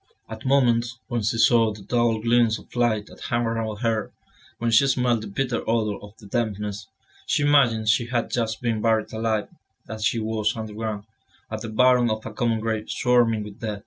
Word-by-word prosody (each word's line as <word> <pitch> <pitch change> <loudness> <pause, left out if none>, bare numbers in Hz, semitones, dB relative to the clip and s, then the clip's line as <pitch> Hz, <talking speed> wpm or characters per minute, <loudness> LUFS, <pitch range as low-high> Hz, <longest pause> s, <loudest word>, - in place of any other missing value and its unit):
At 110 +3 -7
moments, 120 -3 +2
when 120 -1 -1
she 110 +2 0
saw 115 -1 +4
the 105 -1 -10
dull 120 +1 +1
gleams 115 0 +2
of - - -16
light 115 -4 +1
that - - -15
hung 120 0 0
around 115 -2 -3
her, 115 -3 -1 0.5
when 115 0 -1
she 125 +5 +5
smelt 125 -3 +1
the 110 - -7
bitter 125 +4 -2
odour 110 -3 0
of 105 +1 -13
the 110 - -15
dampness, 105 -1 -3 0.4
she 145 - +1
imagined 125 -7 +3
she 115 +2 +3
had 120 -1 -1
just 115 -2 -2
been 115 -3 0
buried 110 -1 +1
alive, 110 -1 -1 0.4
that 110 -1 -7
she 115 - +1
was 110 0 -1
underground, 110 -1 -4 0.5
at 110 -1 -4
the 115 - -5
bottom 125 +1 +4
of 110 0 -3
a 115 - -6
common 115 0 0
grave 110 -1 -3
swarming 120 -3 +2
with 105 +1 -11
dead. 105 -3 -4
115 Hz, 195 wpm, -24 LUFS, 110-120 Hz, 0.5 s, she